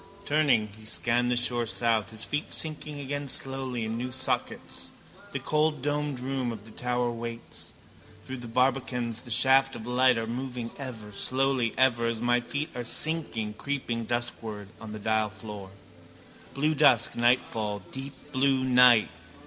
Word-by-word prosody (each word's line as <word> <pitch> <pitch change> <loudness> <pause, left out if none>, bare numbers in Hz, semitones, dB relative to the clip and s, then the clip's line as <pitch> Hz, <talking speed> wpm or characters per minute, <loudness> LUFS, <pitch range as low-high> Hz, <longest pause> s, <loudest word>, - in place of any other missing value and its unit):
Turning, 140 -8 +3
he - - -13
scanned 120 +2 +2
the 125 - +2
shore 120 -1 +3
south, 115 -3 +1
his 110 0 -5
feet 145 +2 -3
sinking 150 -2 -1
again 145 +1 -4
slowly 130 -3 0
in 110 +1 -3
new 125 +1 -4
sockets. 130 0 -3 0.4
The - - -2
cold 150 -2 0
domed 145 -2 -1
room 130 -1 -2
of 110 -2 -8
the 110 - -12
tower 125 +1 -1
waits. 115 0 -7 0.5
Through 130 - -6
the 120 -1 -8
barbacans 125 -1 0
the 125 - -12
shafts 135 +3 +5
of 110 - -7
light 125 +1 +3
are 115 - -1
moving 125 0 -4
ever, 115 -6 -7
slowly 130 +2 0
ever 120 -3 +3
as 115 -1 -1
my 120 +1 +2
feet 140 +5 -4
are 125 - -3
sinking, 120 -6 +1
creeping 120 -2 -3
duskward 115 -4 -4
over 110 - -8
the - - -5
dial 110 0 +1
floor. 100 -1 -9 0.9
Blue 150 +3 +2
dusk, 130 -6 +4
nightfall, 110 -4 +1
deep 135 +1 -7 0.2
blue 135 0 +2
night. 125 -3 +6
125 Hz, 155 wpm, -28 LUFS, 115-135 Hz, 0.9 s, night